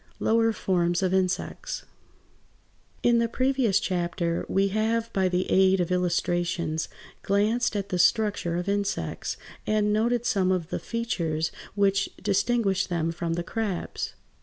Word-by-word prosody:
LOWER 225 Hz, 0 st, +3 dB
FORMS 175 Hz, -3 st, 0 dB
OF 185 Hz, 0 st, +1 dB
INSECTS 185 Hz, -1 st, -1 dB, 1.2 s
In 235 Hz, -1 st, +4 dB
the 230 Hz, -, +2 dB
previous 255 Hz, -5 st, +2 dB
chapter 175 Hz, -2 st, -1 dB
we 195 Hz, +1 st, +2 dB
have 225 Hz, +3 st, 0 dB
by 190 Hz, -1 st, +2 dB
the 180 Hz, 0 st, 0 dB
aid 190 Hz, 0 st, +5 dB
of 175 Hz, 0 st, 0 dB
illustrations 175 Hz, -2 st, 0 dB, 0.3 s
glanced 215 Hz, +4 st, +1 dB
at 200 Hz, -1 st, -2 dB
the 180 Hz, -2 st, -1 dB
structure 200 Hz, -3 st, +2 dB
of 180 Hz, +2 st, -3 dB
insects, 200 Hz, 0 st, -2 dB, 0.3 s
and 210 Hz, -1 st, +2 dB
noted 235 Hz, +2 st, +1 dB
some 190 Hz, -5 st, +2 dB
of 180 Hz, -3 st, -1 dB
the -, -, -2 dB
features 165 Hz, -9 st, -2 dB, 0.2 s
which 200 Hz, -1 st, +2 dB
distinguished 200 Hz, 0 st, +1 dB
them 165 Hz, -2 st, 0 dB
from 165 Hz, 0 st, -3 dB
the 170 Hz, +1 st, -2 dB
crabs. 210 Hz, -1 st, -3 dB
195 Hz, 135 wpm, -26 LUFS, 175-215 Hz, 1.2 s, aid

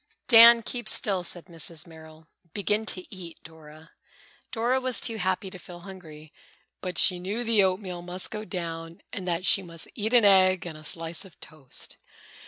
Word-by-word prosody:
"Dan, 230 Hz, 0 st, +9 dB
keep 240 Hz, -1 st, -3 dB
still," 195 Hz, -4 st, +1 dB
said 175 Hz, 0 st, -4 dB
Mrs. 165 Hz, -2 st, -5 dB
Merrill. 160 Hz, -1 st, -15 dB, 0.3 s
"Begin 210 Hz, +2 st, 0 dB
to 185 Hz, -, 0 dB
eat, 175 Hz, -3 st, -9 dB
Dora." 160 Hz, 0 st, -14 dB, 0.6 s
Dora 250 Hz, +2 st, 0 dB
was 255 Hz, -1 st, +1 dB
too 225 Hz, -2 st, -1 dB
happy 190 Hz, 0 st, -2 dB
to 185 Hz, -, -10 dB
feel 175 Hz, 0 st, -11 dB
hungry, 160 Hz, -5 st, -12 dB, 0.5 s
but 180 Hz, -1 st, -5 dB
she 180 Hz, -2 st, +4 dB
knew 200 Hz, +7 st, -3 dB
the 225 Hz, -3 st, +3 dB
oatmeal 185 Hz, -2 st, -1 dB
must 180 Hz, +1 st, -5 dB
go 215 Hz, 0 st, -5 dB
down 165 Hz, -4 st, -6 dB
and 185 Hz, -2 st, -5 dB
that 175 Hz, +1 st, -1 dB
she 195 Hz, -, +5 dB
must 170 Hz, -3 st, -5 dB
eat 220 Hz, +1 st, -2 dB
an 235 Hz, -3 st, +6 dB
egg 185 Hz, -3 st, +5 dB
and 165 Hz, -3 st, -6 dB
a 155 Hz, -, -12 dB
slice 165 Hz, +2 st, -2 dB
of 190 Hz, -4 st, -16 dB
toast. 145 Hz, -5 st, -6 dB
185 Hz, 180 wpm, -26 LUFS, 165-210 Hz, 0.6 s, Dan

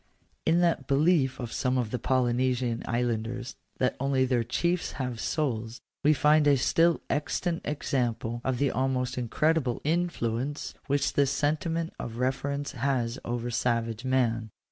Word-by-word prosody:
In 165 Hz, +2 st, +4 dB
that 165 Hz, -6 st, +1 dB
belief 140 Hz, -1 st, +3 dB
of 120 Hz, -3 st, -5 dB
some 130 Hz, -1 st, 0 dB
of 120 Hz, -4 st, -1 dB
the 125 Hz, -, -2 dB
Polynesian 125 Hz, -1 st, +1 dB
Islanders 120 Hz, +1 st, -2 dB, 0.2 s
that 125 Hz, -, +1 dB
only 135 Hz, -1 st, +2 dB
their 125 Hz, -2 st, +1 dB
chiefs 170 Hz, +9 st, -1 dB
have 125 Hz, -4 st, -4 dB
souls, 115 Hz, -7 st, -2 dB, 0.2 s
we 150 Hz, -, +6 dB
find 150 Hz, 0 st, +4 dB
a 140 Hz, -1 st, +5 dB
still 165 Hz, +6 st, +3 dB
ex 150 Hz, -, -1 dB
tant 175 Hz, -2 st, -2 dB
example 120 Hz, -5 st, -1 dB
of 130 Hz, -2 st, 0 dB
the 140 Hz, +2 st, +1 dB
almost 130 Hz, -1 st, 0 dB
incredible 130 Hz, +2 st, +1 dB
influence 145 Hz, -5 st, -1 dB
which 140 Hz, 0 st, +1 dB
this 140 Hz, -1 st, +3 dB
sentiment 160 Hz, +4 st, -1 dB
of 115 Hz, -1 st, -5 dB
reverence 140 Hz, +3 st, -1 dB
has 125 Hz, -2 st, -1 dB
over 120 Hz, 0 st, -3 dB
savage 115 Hz, -1 st, 0 dB
men. 120 Hz, -4 st, +1 dB
130 Hz, 145 wpm, -28 LUFS, 120-145 Hz, 0.2 s, we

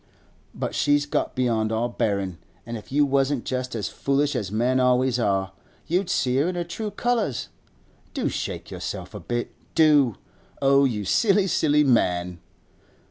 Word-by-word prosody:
But -, -, -3 dB
she's 145 Hz, 0 st, +2 dB
got 145 Hz, -, -2 dB
beyond 115 Hz, -4 st, +1 dB
all 115 Hz, +2 st, 0 dB
bearin'; 100 Hz, -7 st, -2 dB, 0.3 s
and 115 Hz, 0 st, -5 dB
if 110 Hz, +1 st, -10 dB
you 145 Hz, +1 st, +3 dB
wasn't 135 Hz, -1 st, +1 dB
just 130 Hz, -1 st, -3 dB
as 105 Hz, -, -2 dB
foolish 140 Hz, +1 st, 0 dB
as 105 Hz, -6 st, -2 dB
men 125 Hz, +4 st, +1 dB
always 125 Hz, 0 st, +2 dB
are, 95 Hz, -3 st, 0 dB, 0.3 s
you'd 180 Hz, +2 st, 0 dB
see 130 Hz, -6 st, +1 dB
her 145 Hz, +5 st, +2 dB
in 180 Hz, -, -2 dB
her 175 Hz, -, -1 dB
true 210 Hz, +6 st, -5 dB
colours. 230 Hz, -, -1 dB, 0.7 s
Do -, -, 0 dB
shake -, -, -4 dB
yourself -, -, -6 dB
a -, -, -6 dB
bit, 120 Hz, 0 st, -3 dB, 0.2 s
do! 145 Hz, -, +5 dB, 0.4 s
Oh, 140 Hz, 0 st, +4 dB
you 105 Hz, -6 st, -1 dB
silly, 200 Hz, -, +3 dB
silly 150 Hz, -5 st, +3 dB
man! 90 Hz, -9 st, +1 dB
130 Hz, 160 wpm, -24 LUFS, 110-145 Hz, 0.7 s, do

